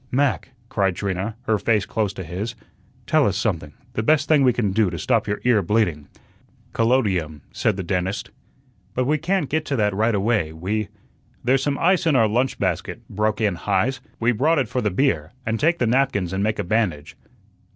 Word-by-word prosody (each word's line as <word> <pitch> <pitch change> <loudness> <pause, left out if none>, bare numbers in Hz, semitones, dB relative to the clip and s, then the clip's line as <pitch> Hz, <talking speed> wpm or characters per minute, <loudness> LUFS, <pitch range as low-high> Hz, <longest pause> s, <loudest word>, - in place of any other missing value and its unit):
"Mac," 135 0 0 0.2
cried 95 -5 0
Trina, 100 +3 -3
her 110 -4 +1
face 105 -3 +1
close 105 -3 -1
to 95 - -6
his, 95 +8 -5 0.5
"tell 155 +4 +3
us 100 -1 0
something 85 -9 -2 0.2
the - - -1
best 150 +5 +2
thing 155 -3 +4
we 130 -2 +5
can 115 -5 0
do 105 0 +2
to 85 - -5
stop 95 - +1
your 105 0 -1
ear 120 -4 +4
bleeding." 85 -7 0 0.7
"Collodium," 95 - +1
said 105 -3 0
the 95 - -3
dentist. 90 +2 -2 0.6
"But 125 - +1
we 150 +3 +1
can't 175 0 0
get 155 +3 0
to 140 - -1
that 105 -4 +1
right 110 +3 +1
away; 100 -6 +1
we 100 +6 -2 0.3
" - - -36
"There's 130 +2 +3
some 140 0 0
ice 180 0 +2
in 155 - +3
our 115 -4 +5
lunch 125 +5 0
basket," - - -3
broke 105 +1 0
in 105 -3 +2
Heise. 110 +9 0 0.2
"We 115 +1 +3
brought 150 +8 +2
it 135 -4 +1
for 125 - -1
the 105 - +1
beer; 135 +9 0
and 110 0 -1
take 170 +3 +2
the 125 - +1
napkins 115 -7 +1
and 95 +1 0
make 110 +1 0
a 105 - -1
bandage." 90 -7 -1
110 Hz, 205 wpm, -22 LUFS, 95-130 Hz, 0.7 s, we